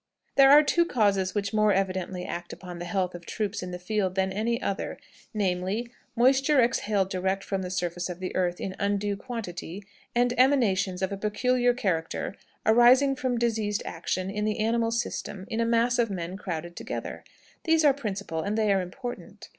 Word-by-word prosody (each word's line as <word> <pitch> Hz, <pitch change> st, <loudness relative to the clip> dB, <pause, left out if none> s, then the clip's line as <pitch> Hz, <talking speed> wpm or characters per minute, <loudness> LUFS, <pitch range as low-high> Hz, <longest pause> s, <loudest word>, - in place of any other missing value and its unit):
"There 270 Hz, -1 st, +7 dB
are 295 Hz, +2 st, +9 dB
two 340 Hz, +3 st, +3 dB
causes 200 Hz, -, +1 dB
which 200 Hz, 0 st, -1 dB
more 215 Hz, -1 st, +4 dB
evidently 185 Hz, -1 st, -2 dB
act 175 Hz, 0 st, -5 dB
upon 180 Hz, -2 st, -8 dB
the 175 Hz, -, -5 dB
health 185 Hz, 0 st, -1 dB
of 175 Hz, -1 st, -9 dB
troops 210 Hz, +4 st, -3 dB
in 180 Hz, -, -5 dB
the 180 Hz, -, -5 dB
field 185 Hz, 0 st, -1 dB
than 190 Hz, 0 st, +1 dB
any 230 Hz, +4 st, 0 dB
other, 200 Hz, -6 st, -3 dB, 0.3 s
namely, 200 Hz, +3 st, -1 dB, 0.2 s
moisture 270 Hz, +4 st, +4 dB
exhaled 210 Hz, -5 st, +1 dB
direct 190 Hz, +1 st, -1 dB
from 195 Hz, -1 st, -2 dB
the 180 Hz, -, -4 dB
surface 175 Hz, -1 st, -2 dB
of 175 Hz, 0 st, -6 dB
the 185 Hz, -1 st, -5 dB
earth 180 Hz, -1 st, 0 dB
in 190 Hz, -1 st, -4 dB
undue 200 Hz, 0 st, 0 dB
quantity, 200 Hz, -5 st, -6 dB, 0.3 s
and 245 Hz, 0 st, +3 dB
emanations 200 Hz, -9 st, +3 dB
of 190 Hz, -, 0 dB
a 200 Hz, -, -3 dB
peculiar 245 Hz, +4 st, +1 dB
character 180 Hz, -6 st, -2 dB, 0.3 s
arising 250 Hz, +5 st, +6 dB
from 255 Hz, -2 st, -1 dB
diseased 220 Hz, -3 st, 0 dB
action 185 Hz, +3 st, -3 dB
in 210 Hz, +1 st, -2 dB
the 215 Hz, 0 st, 0 dB
animal 225 Hz, +1 st, +1 dB
system 210 Hz, -4 st, -3 dB
in 225 Hz, -, -1 dB
a 230 Hz, -, +2 dB
mass 235 Hz, +1 st, +2 dB
of 230 Hz, -2 st, +2 dB
men 180 Hz, -2 st, -4 dB
crowded 175 Hz, -3 st, -5 dB
together. -, -, -6 dB, 0.4 s
These 325 Hz, -1 st, +3 dB
are 285 Hz, -, +6 dB
principal, 200 Hz, -, -4 dB
and 205 Hz, +4 st, -2 dB
they 215 Hz, -2 st, +3 dB
are 195 Hz, -, +2 dB
important. 245 Hz, +7 st, -8 dB
205 Hz, 185 wpm, -27 LUFS, 185-235 Hz, 0.4 s, are